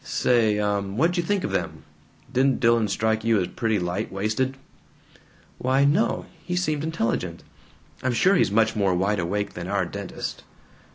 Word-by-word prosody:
"Say, 115 -4 +2
uh, 105 -1 +1
what'd 120 - 0
you 175 - +2
think 195 +2 -1
of - - -2
them? - - -3 0.5
Didn't 135 +1 +2
Dillon 115 -2 +3
strike 110 +2 0
you 115 -2 +3
as 90 - -1
pretty 110 -3 0
light 90 +3 -2
waisted?" 110 +7 -1 1.0
"Why 130 +2 +2
no. 160 +11 +2 0.2
He 180 - -3
seemed 155 -5 0
intelligent. 115 - -2 0.6
I'm 130 -1 0
sure 185 +11 +4
he's 180 - +3
much 110 +2 +2
more 100 -3 +2
wide 100 +2 +1
awake 100 +4 -2
than 90 0 -6
our 100 -1 0
dentist." 100 +2 -6
110 Hz, 165 wpm, -24 LUFS, 100-135 Hz, 1.0 s, sure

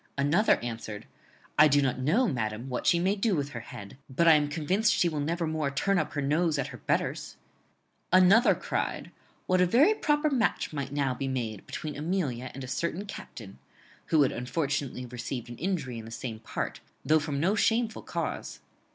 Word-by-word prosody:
Another 150 +10 +4
answered, 115 -3 -6 0.5
'I 155 - +9
do 145 0 +4
not 130 -2 0
know, 195 - +2
madam, 115 - -3
what 125 - -3
she 170 - +5
may 185 +4 +1
do 210 -1 +1
with 145 -2 -2
her 120 - -6
head, 110 -1 -10
but 170 +6 +2
I 165 - +9
am 150 -1 +3
convinced 175 +8 +1
she 175 - +3
will 155 -3 -2
never 165 +4 -1
more 155 -2 -1
turn 190 +8 +1
up - - -3
her 145 - -2
nose 155 +2 +1
at 140 - -2
her - - -10
betters.' - - -2 0.7
Another 185 +6 +6
cried, - - -3 0.3
'What 185 0 +2
a 180 - +4
very 285 - +5
proper 300 -6 +1
match 240 - 0
might 140 -2 -4
now 140 -2 0
be 135 +1 -4
made 115 -6 -4
between 150 -2 -5
Amelia 145 -6 -2
and 135 - -6
a - - -6
certain 170 +8 -2
captain,' 110 - -9 0.5
who 155 -3 +4
had 135 - +1
unfortunately 135 0 -2
received 125 0 -6
an 120 - -8
injury 150 -9 -2
in 110 - -9
the - - -9
same 115 -1 -6
part, 115 - -4 0.3
though 155 +1 +4
from 145 -2 -3
no 180 +7 +2
shameful 225 +1 +1
cause. - - -4
145 Hz, 195 wpm, -28 LUFS, 130-180 Hz, 0.7 s, I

